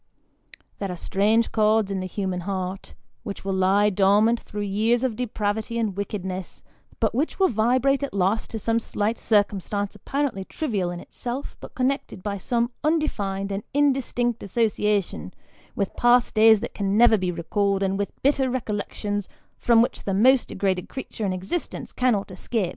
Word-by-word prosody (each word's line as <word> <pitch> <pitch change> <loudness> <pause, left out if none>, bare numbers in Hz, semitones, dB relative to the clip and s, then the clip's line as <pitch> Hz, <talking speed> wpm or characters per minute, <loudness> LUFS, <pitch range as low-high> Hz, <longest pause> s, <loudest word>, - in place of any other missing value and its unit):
There 195 -2 -3
are - - -4
strange 215 +6 +1
chords 215 -1 +2
in 195 - -1
the 185 - -3
human 185 -1 -3
heart, 185 +1 -4 0.3
which 200 -4 -7
will 195 - -1
lie 195 +2 +3
dormant 205 +4 +4
through 210 - -7
years 220 +5 +1
of 255 -4 0
depravity 220 -1 -2
and 220 -5 -1
wickedness, 190 -2 -5 0.4
but 220 -3 +1
which 280 +7 -1
will 380 -1 +4
vibrate 255 +5 +2
at 280 - -3
last 195 +3 0
to 225 - -4
some 225 +2 +1
slight 220 0 -2
circumstance 205 -1 0
apparently 275 -9 -2
trivial 205 - -2
in 175 0 -5
itself, 250 +8 -6
but - - -11
con 255 -1 +2
nected 275 -9 -5
by 205 -1 -2
some 235 +5 0
undefined 200 -12 0
and 195 +1 -2
indistinct 260 -4 +1
association, 210 -2 -1 0.4
with 200 -2 -2
past 240 0 +4
days 220 -1 +6
that - - -5
can 200 0 0
never 235 -1 +7
be 185 -3 -1
recalled, 195 +3 0
and 195 +1 0
with 200 - -2
bitter 270 -1 +3
recollections 205 -4 -3 0.3
from 230 -1 +5
which - - -4
the 195 - 0
most 255 +5 +5
degraded 190 -2 -1
creature 230 -5 -5
in - - 0
existence 190 - -4
cannot 225 -6 +1
escape. 185 +1 -2
210 Hz, 165 wpm, -24 LUFS, 195-240 Hz, 0.4 s, never